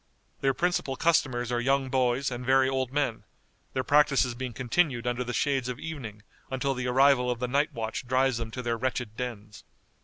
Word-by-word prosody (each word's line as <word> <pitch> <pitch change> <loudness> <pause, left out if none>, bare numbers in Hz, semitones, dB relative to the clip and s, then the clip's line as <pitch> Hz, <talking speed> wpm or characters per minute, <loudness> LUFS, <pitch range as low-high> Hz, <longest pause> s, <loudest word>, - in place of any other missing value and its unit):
Their 135 -1 +1
principal 175 -6 0
customers 125 -7 +1
are 120 0 0
young 135 +1 +1
boys 130 +1 +1
and 125 0 -5
very 130 +1 +4
old 130 -1 -1
men, 140 -5 -1 0.5
their 130 - -1
practices 145 -4 +3
being 125 +1 -5
continued 130 +1 0
under 120 0 -1
the 125 - -4
shades 135 0 0
of 125 - -4
evening 115 -10 -7 0.3
until 135 +1 -1
the 125 -1 -3
arrival 130 0 +4
of 125 - -1
the 125 +1 -2
night 140 +5 +1
watch 115 -1 -4
drives 130 -1 +2
them 115 -1 -4
to 125 +3 -6
their 120 -1 -1
wretched 120 -2 -3
dens. 110 -4 -6
130 Hz, 190 wpm, -28 LUFS, 120-135 Hz, 0.5 s, very